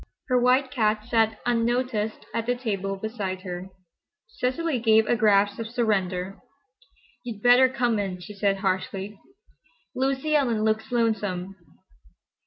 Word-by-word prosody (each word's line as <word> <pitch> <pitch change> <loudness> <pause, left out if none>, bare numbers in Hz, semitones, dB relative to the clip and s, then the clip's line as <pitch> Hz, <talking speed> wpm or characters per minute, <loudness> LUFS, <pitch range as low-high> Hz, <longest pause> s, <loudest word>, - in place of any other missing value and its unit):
Her 250 -1 +3
white 255 +2 +3
cat 215 -4 0
sat 225 -2 +1
unnoticed 235 -2 0
at 230 0 -2
the 245 - +1
table 195 -5 -3
beside 195 -3 -4
her. 180 0 -6 0.6
Cecily 320 - -2
gave 220 -1 +4
a 240 - +2
gasp 205 -2 +3
of 225 - -4
surrender. 195 -5 -1 0.8
"You'd 225 -4 -7
better 250 +2 +6
come 245 -4 0
in," 190 -3 -3
she 195 +4 -10
said, 200 -1 0
harshly. 195 +1 -3 0.7
"Lucy 270 +3 0
Ellen 240 -7 +2
looks 220 +1 0
lonesome." 205 -6 -1
220 Hz, 130 wpm, -25 LUFS, 200-245 Hz, 0.8 s, better